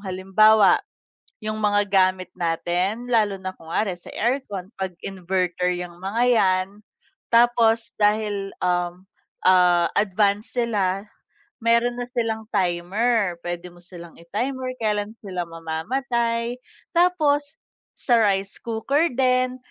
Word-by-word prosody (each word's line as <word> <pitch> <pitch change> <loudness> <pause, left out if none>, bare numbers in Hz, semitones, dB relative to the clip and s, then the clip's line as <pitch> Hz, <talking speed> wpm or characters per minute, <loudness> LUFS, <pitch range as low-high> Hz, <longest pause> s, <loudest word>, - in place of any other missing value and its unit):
halimbawa, 195 +2 +4 0.6
yung 215 0 -3
mga 205 -1 +2
gamit 185 -2 +2
natin 180 +7 -1
lalo 215 -4 +2
na 185 - -3
kunwari 180 +4 -2
sa - - -13
aircon 215 -6 -2
pag 190 -2 -3
inverter 180 -1 -1
yang 175 -1 -7
mga 205 +6 -1
yan. 185 0 +2 0.7
Tapos 230 -2 +3
dahil, 205 -2 +1
um, 175 0 -1 0.4
ah, 180 -2 +5
advance 205 +1 +1
sila, 200 -5 0 0.6
meron 235 +1 +3
na 245 - -3
silang 225 -2 -2
timer, 190 +1 0
pwede 175 0 -4
mo 175 - -18
silang 170 -2 -11
i-timer, 255 +9 -3
kailan 210 0 -1
sila 180 -3 -4
mamamatay. 230 +9 -2 0.4
Tapos 325 -5 +3 0.5
sa 240 -3 +2
rice 195 -2 +1
cooker 270 +7 0
din 255 -1 +2
205 Hz, 115 wpm, -23 LUFS, 180-230 Hz, 0.7 s, ah